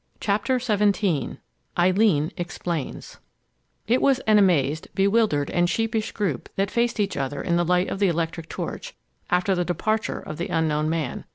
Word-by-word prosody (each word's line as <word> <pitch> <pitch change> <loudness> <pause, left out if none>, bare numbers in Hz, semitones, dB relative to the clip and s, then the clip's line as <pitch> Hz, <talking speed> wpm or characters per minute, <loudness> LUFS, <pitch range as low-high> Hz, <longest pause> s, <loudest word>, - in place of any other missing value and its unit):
CHAPTER 215 +6 +1
XVII 205 - +1 0.4
EILEEN 180 -3 +3
EXPLAINS 175 -3 -5 0.7
It 240 +4 +2
was 275 -2 +4
an 215 -3 +4
amazed, 160 -6 +2
bewildered, 195 -7 +2
and 175 0 +2
sheepish 225 +2 -1
group 180 - -2
that 195 0 0
faced 235 -1 0
each 200 -1 0
other 140 +1 -3
in 170 - 0
the 175 - +2
light 180 +2 +2
of - - -4
the 200 - +4
electric 165 -1 -2
torch - - -6 0.3
after 180 +2 +2
the 180 -1 +1
departure 215 +5 -1
of 155 - -8
the 170 - -2
unknown 155 -1 0
man. 160 -6 -3
180 Hz, 160 wpm, -24 LUFS, 165-215 Hz, 0.7 s, was